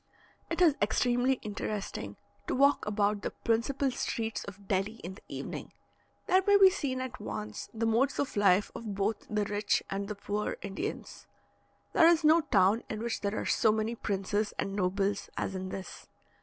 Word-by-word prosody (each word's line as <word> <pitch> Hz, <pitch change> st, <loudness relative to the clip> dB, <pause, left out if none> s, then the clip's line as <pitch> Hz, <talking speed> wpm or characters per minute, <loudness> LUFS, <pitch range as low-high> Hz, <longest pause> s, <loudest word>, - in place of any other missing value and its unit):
It 335 Hz, +2 st, +2 dB
is 325 Hz, -4 st, +6 dB
extremely 245 Hz, +4 st, +2 dB
interesting 200 Hz, -, -4 dB, 0.3 s
to -, -, 0 dB
walk 280 Hz, -1 st, +3 dB
about 205 Hz, 0 st, +1 dB
the -, -, -2 dB
principal 260 Hz, +4 st, 0 dB
streets 225 Hz, -2 st, -3 dB
of 200 Hz, 0 st, -11 dB
Delhi 195 Hz, +3 st, 0 dB
in 180 Hz, +3 st, -5 dB
the 190 Hz, -, -15 dB
evening. -, -, -6 dB, 0.5 s
There 375 Hz, +1 st, +4 dB
may 405 Hz, 0 st, +7 dB
be 385 Hz, -1 st, +8 dB
seen 275 Hz, -9 st, -2 dB
at 255 Hz, -1 st, -6 dB
once 105 Hz, -, -5 dB
the 225 Hz, 0 st, -2 dB
modes 235 Hz, +5 st, +2 dB
of 285 Hz, -, -2 dB
life 200 Hz, -1 st, +3 dB
of 215 Hz, -4 st, -6 dB
both 205 Hz, +2 st, -1 dB
the 210 Hz, -1 st, 0 dB
rich 205 Hz, +1 st, 0 dB
and 200 Hz, +1 st, -2 dB
the 210 Hz, -, -4 dB
poor 205 Hz, +1 st, -3 dB
Indians. 195 Hz, -1 st, -5 dB, 0.7 s
There 330 Hz, -, +6 dB
is 340 Hz, -1 st, +4 dB
no 315 Hz, +2 st, +6 dB
town 205 Hz, -5 st, +3 dB
in 215 Hz, 0 st, -4 dB
which 235 Hz, -, -2 dB
there 200 Hz, +1 st, -1 dB
are -, -, -2 dB
so 220 Hz, -, +3 dB
many 220 Hz, +1 st, -1 dB
princes 205 Hz, -1 st, -2 dB
and 195 Hz, -, -2 dB
nobles 195 Hz, +1 st, 0 dB
as -, -, -2 dB
in 185 Hz, 0 st, -4 dB
this. 190 Hz, 0 st, -8 dB
215 Hz, 180 wpm, -30 LUFS, 200-255 Hz, 0.7 s, be